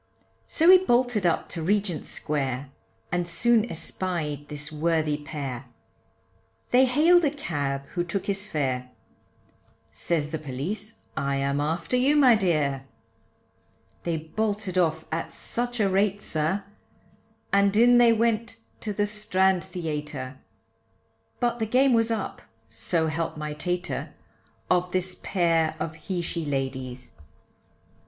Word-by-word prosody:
So 335 +3 +5
he 370 - +9
bolted 245 - +2
up 170 - 0
to 165 - -5
Regent 195 -2 0
Square, 135 -2 -2 0.4
And 175 0 -1
soon 230 +6 +3
espied 155 -5 -3
this 150 0 -5
worthy 155 -1 +1
pair, 140 -4 -6 1.1
They 255 +2 +6
hailed 320 +7 +5
a 295 - +4
cab, 140 - -3
who 175 - -1
took 175 +2 -3
his 195 0 -2
fare, 130 -7 -2 1.0
Says 155 -3 -1
the 160 - -2
police, 175 - -4 0.2
I 140 0 -1
am 140 +1 0
after 165 +8 -1
you 270 +4 +3
my 270 -5 +7
dear. 150 -10 +1 1.1
They 170 -2 -1
bolted 200 +4 -2
off 160 -3 +1
at 165 +1 -3
such 245 0 -3
a 205 - +3
rate, 195 +1 +2
sir, 160 +6 -1 0.9
And 200 +1 +4
in 240 +1 +7
they 240 -1 +7
went 230 0 +1 0.2
to 210 - -3
the 205 +1 +1
Strand 190 -4 +1
Theatre, 150 -6 -5 1.0
But 240 -1 0
the 220 - 0
game 255 +3 +4
was 230 -1 +3
up, 225 -3 -3 0.3
so 160 +9 0
help 160 +1 -2
my 150 0 -4
tater, 180 +3 -3 0.5
Of 180 0 +1
this 185 0 0
pair 165 -4 +1
of 160 - -3
he 175 +3 -4
she 170 0 -3
ladies. 130 -3 -4
175 Hz, 135 wpm, -26 LUFS, 150-215 Hz, 1.1 s, he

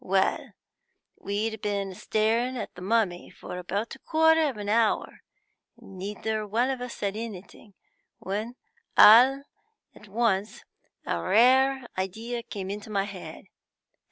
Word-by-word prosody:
Well, 190 0 0 0.6
we'd 210 +2 -3
been 200 -2 -2
staring 225 +6 0
at 225 - -5
a 180 - -11
mummy 195 -3 0
for 180 - -8
about 200 +5 -3
a 270 - -11
quarter 320 0 +3
of 255 - -7
an 205 -1 -6
hour, 220 +1 +1 0.6
and 190 -1 -13
neither 210 +3 -3
of 210 0 -8
us 250 0 -1
said 200 0 -3
anything, 210 -2 -9 0.4
when 215 +5 -4 0.4
all 255 +6 +8 0.5
at 210 - -16
once 210 0 -1 0.4
a - - -2
rare 260 +6 +4
idea 225 +6 -4
came 195 -4 -6
into 205 +1 -7
my 200 -2 0
head. 195 -2 -9
215 Hz, 130 wpm, -27 LUFS, 195-240 Hz, 0.6 s, all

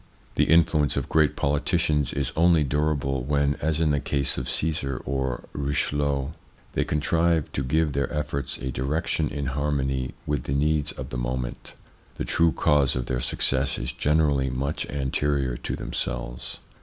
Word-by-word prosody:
The - - +3
influence 80 -3 +4
of - - -1
great 75 -2 +3
politicians 75 -1 +1
is 70 -3 -1
only 85 -1 +5
durable 70 -1 0
when, 70 +1 +2
as 80 +1 0
in 80 -2 +3
the 70 - +2
case 70 -1 0
of 65 - -3
Caesar 75 -5 -1
or 65 -2 -2
Richelieu, 70 -1 0 0.4
they - - +1
contrive 80 +1 +1
to - - -2
give 75 +3 +1
their 70 +1 -1
efforts 70 -3 -3
a 65 - -4
direc 70 +7 -1
tion 75 -2 0
in 70 -1 -3
harmony 70 -1 -1
with 75 0 -1
the 70 - -1
needs 75 +1 +1
of - - -7
the 60 - -3
moment; - - -4 0.4
the - - -3
true 85 0 +3
cause 75 -5 +3
of 65 -1 -1
their 60 -1 -1
success 65 +1 0
is 60 - -3
generally 75 -2 +2
much 70 +4 -2
anterior 70 -1 0
to - - -3
themselves. 60 -1 -4
70 Hz, 165 wpm, -26 LUFS, 65-75 Hz, 0.4 s, only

